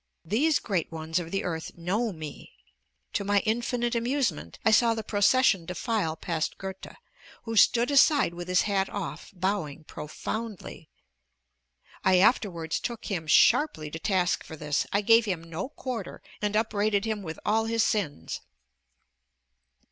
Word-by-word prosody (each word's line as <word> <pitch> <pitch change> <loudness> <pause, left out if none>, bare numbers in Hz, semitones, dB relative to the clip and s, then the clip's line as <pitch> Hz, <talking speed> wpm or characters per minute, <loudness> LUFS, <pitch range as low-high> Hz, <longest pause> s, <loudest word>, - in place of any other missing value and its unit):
These 260 - +2
great 185 -7 -2
ones 160 +1 -2
of 170 -2 -6
the 195 +2 -2
earth 165 -2 -5
know 205 +7 -1
me. 155 -4 -9 0.6
To 205 - 0
my 200 0 +2
infinite 240 +2 -1
amusement, 235 - -1
I 220 - +5
saw 230 +1 +4
the 220 - -4
procession 205 -1 +3
defile 180 -3 -1
past 165 -1 -3
Goethe, 190 0 -8 0.5
who 225 -1 -4
stood 240 +4 +5
aside 285 - +5
with 175 0 -7
his 180 0 +3
hat 195 -2 0
off, 200 -4 -6
bowing 180 -5 -2
profoundly. 200 +3 -6 1.1
I 190 -1 +5
afterwards 180 -5 +2
took 235 -2 -5
him 165 -5 -3
sharply 180 - +4
to 165 - -6
task 180 -2 +1
for 160 - -9
this; 150 -2 -1
I 200 - +2
gave 225 +2 +5
him 180 -5 -2
no 165 +8 -5
quarter 250 -8 -6 0.2
and 210 0 -1
upbraided 215 -1 +1
him 220 -2 -2
with 160 -4 -6
all 220 +1 +2
his 230 0 +1
sins. 160 - -2
200 Hz, 150 wpm, -27 LUFS, 170-225 Hz, 1.1 s, I